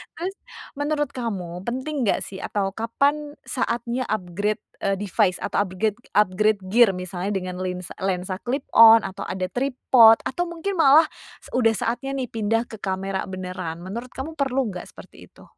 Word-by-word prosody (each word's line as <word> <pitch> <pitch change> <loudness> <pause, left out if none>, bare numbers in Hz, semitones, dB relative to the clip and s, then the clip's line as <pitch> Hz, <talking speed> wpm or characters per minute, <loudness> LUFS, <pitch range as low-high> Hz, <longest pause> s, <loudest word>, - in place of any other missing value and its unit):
Terus 370 +3 -4 0.4
menurut 295 -1 0
kamu, 190 -8 -5
penting 260 +1 -2
nggak - - +1
sih? 190 - -8
Atau 195 -2 -2
kapan 285 +8 -1
saatnya 240 0 -2
upgrade, 205 +1 -2 0.2
eee, 195 0 0
device 190 -2 +1
atau - - -1
upgrade, 205 +4 -2 0.2
upgrade 210 0 +3
gear? 225 -3 +5
Misalnya 180 +2 -4
dengan 185 -1 -4
lens 180 -1 -4
lensa 185 0 -2
clip 260 +5 -3
on 225 -1 +8
atau 195 +1 -6
ada 185 0 -3
tripod 245 -2 +5
atau 350 +7 -2
mungkin 340 +2 -4
malah, 300 +1 +7 0.5
udah 225 -3 +3
saatnya 255 +6 -2
nih 260 -3 -3
pindah 225 +1 0
ke 220 - -8
kamera 190 0 -3
beneran? 185 -3 -6
Menurut 235 +7 -7
kamu, 270 +5 -5
perlu 270 -1 +1
nggak 180 - -7
seperti - - -14
itu? - - -19
220 Hz, 160 wpm, -23 LUFS, 190-260 Hz, 0.5 s, on